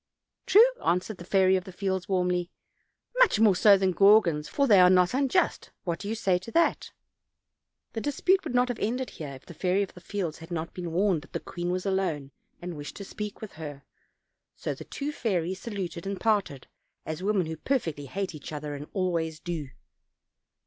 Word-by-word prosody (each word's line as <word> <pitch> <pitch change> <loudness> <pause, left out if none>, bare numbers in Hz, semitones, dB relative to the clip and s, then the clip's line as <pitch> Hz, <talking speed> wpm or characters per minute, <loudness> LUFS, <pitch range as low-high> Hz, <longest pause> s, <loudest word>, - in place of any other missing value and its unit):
"True," 435 +4 +8 0.2
answered 180 +4 0
the 175 - -9
Fairy 190 +1 +3
of 185 -1 -1
the 190 - -8
Fields 190 -1 -2
warmly, 180 -2 +1 0.7
"much - - +5
more 215 -4 +5
so 200 +2 +6
than 190 -1 +1
Gaugans, 190 -7 +5
for 280 - +1
they 210 -7 +6
are 180 0 +8
not 180 +1 +4
unjust 275 +7 +1
what 170 -2 -3
say 200 - -5 0.2
you 180 - +3
to 205 +6 -10
that?" 335 - +2 1.0
The 225 - -3
dispute 360 - +2
would 245 - -4
not 250 0 +3
have 245 - -3
ended 250 +4 -2
here, 145 -3 -7
if 130 - -15
the - - -10
Fairy 185 +4 +1
of 195 - -8
the 180 - -13
Fields 180 -6 -4
had 165 - -11
not 165 -1 -4
been 175 -2 -5
warned 180 -1 +2
that - - -18
the - - -1
queen 175 0 -5
was 180 +1 -2
alone 185 -8 -1 0.3
and 175 -1 -6
wished 145 -1 -7
to 200 - -7
speak 210 +1 -6
with 215 - -7
her. 145 -3 -8 0.7
So - - -3
the - - -10
two 290 +1 -4
fairies 185 - -1
saluted 190 -5 -5
and 195 -1 -3
parted, 200 - 0 0.4
as 160 +2 -5
women 195 -2 +1
who 160 0 -5
perfectly 160 - -2
hate 190 +5 -3
each 155 -1 -9
other 145 -1 -5
always 165 -4 -1
do. 165 -5 -4
185 Hz, 195 wpm, -28 LUFS, 165-205 Hz, 1.0 s, True